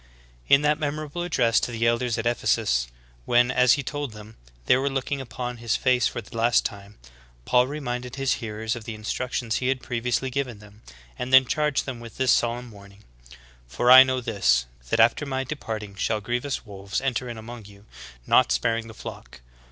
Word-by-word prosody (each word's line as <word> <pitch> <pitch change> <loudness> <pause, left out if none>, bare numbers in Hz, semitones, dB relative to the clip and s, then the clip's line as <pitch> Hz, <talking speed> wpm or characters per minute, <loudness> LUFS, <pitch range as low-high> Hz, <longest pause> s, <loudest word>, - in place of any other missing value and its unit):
In 140 +1 +5
that 150 +1 +2
memorable 150 +2 -3
address 125 -10 +2
to - - -3
the 115 0 -1
elders 120 0 +1
at 115 - -3
Ephesus, 60 - +1 0.4
when, 120 +1 +3
as 125 -1 +5
he 140 - -1
told 145 -5 -4
them, 105 +1 -12 0.3
they - - +5
were 135 +2 0
looking 135 +1 -3
upon 125 -1 -6
his 115 -1 -1
face 125 -2 +2
for 120 - -5
the 115 - -14
last 115 +1 +2
time, 100 0 -7 0.5
Paul 125 0 +3
reminded 125 -4 -5
his 135 -1 +1
hearers 110 +1 -3
of 115 -2 -9
the 115 - -6
instructions 120 +2 -3
he 125 - -2
had 130 -1 -1
previously 125 +2 -2
given 130 -4 -3
them, 105 +1 -17 0.4
and 125 - -4
then 130 0 +8
charged 150 +1 0
them 130 -3 -6
with 115 -2 -11
this 130 -2 +2
solemn 120 0 0
warning: 100 0 -16 0.6
"For 120 - +2
I 130 +1 +12
know 130 -1 +2
this, 85 - +1 0.2
that - - +1
after 115 +6 +4
my 135 -1 -2
de 135 +4 -5
parting 110 -7 -6
shall 110 +2 -1
grievous 120 +6 -3
wolves 100 -1 -4
enter 125 -2 -2
in 120 - -6
among 115 0 -9
you, 100 0 -16 0.4
not - - +4
spar 65 - +1
ing 115 0 -6
the 110 - -11
flock. 65 - -10
120 Hz, 200 wpm, -25 LUFS, 110-130 Hz, 0.6 s, I